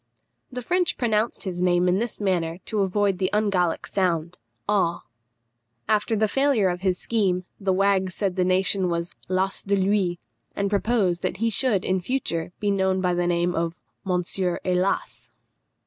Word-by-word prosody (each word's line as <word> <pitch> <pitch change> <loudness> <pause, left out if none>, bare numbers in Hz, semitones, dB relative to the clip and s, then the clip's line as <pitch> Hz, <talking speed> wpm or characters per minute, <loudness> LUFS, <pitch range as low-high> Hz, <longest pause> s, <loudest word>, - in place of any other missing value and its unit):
The 250 -1 -5
French 360 +4 0
pronounced 225 -1 0
his 180 -3 -4
name 180 0 +3
in 180 +2 +2
this 235 0 -3
manner 175 -5 0
to 215 - -2
avoid 195 0 +1
the 185 - +1
ungallic 195 -5 +1
sound, 175 -3 -1 0.3
aw. 190 -5 +1 0.8
After 215 +1 +1
the 215 0 +2
failure 270 -4 +2
of 180 0 -3
his 185 -2 +1
scheme, 185 -5 0
the 195 -2 0
wags 190 -1 +1
said 195 -3 -1
the 185 - +2
nation 185 0 +2
was 170 0 -3 0.2
lasse 190 +1 0
de 200 0 0
lui, 190 -2 +1 0.4
and 200 0 -1
proposed 200 -4 +1
that - - -2
he 230 +3 0
should 215 -4 +1
in 185 0 0
future 175 -8 -2
be 205 -1 0
known 190 -1 +1
by 180 -1 +1
the 175 0 0
name 175 0 +1
of 165 0 -1 0.3
Monsieur 180 -1 0
He_las_! 180 - -1
190 Hz, 165 wpm, -24 LUFS, 180-205 Hz, 0.8 s, name